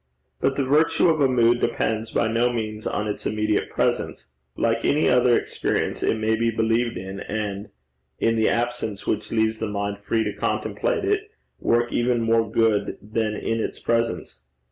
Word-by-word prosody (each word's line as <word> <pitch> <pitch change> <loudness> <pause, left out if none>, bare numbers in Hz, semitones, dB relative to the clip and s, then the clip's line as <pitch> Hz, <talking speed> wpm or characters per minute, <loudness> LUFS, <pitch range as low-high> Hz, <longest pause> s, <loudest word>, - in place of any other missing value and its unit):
But 135 - +1
the 140 - 0
virtue 155 +5 +3
of 155 -2 +2
a 140 - +5
mood 120 -1 +3
depends 110 -1 -1
by - - +1
no 115 +2 +2
means 110 -2 -4
on 105 - -2
its 105 - -3
immediate 105 0 0
presence. - - -1 0.3
Like 115 0 +1
any 150 +2 +2
other 125 -1 +4
experience, - - -2
it - - +1
may 110 0 +1
be 115 +1 +1
believed 115 +1 0
in, 95 +2 -6
and, 105 -1 -4 0.5
in 115 0 +1
the 110 -1 +2
absence 115 -4 -2
which 105 - -2
leaves 110 -1 +1
the 110 - -2
mind 100 0 -3
free 110 +2 0
to 105 -1 -3
contemplate 435 - -1
it, 410 +1 0 0.3
work 120 +1 +1
even 120 0 +1
more 115 -1 +2
good 110 -2 +1
than 110 0 -2
in 115 +1 -2
its - - -3
presence. 115 0 -1
115 Hz, 175 wpm, -24 LUFS, 110-120 Hz, 0.5 s, a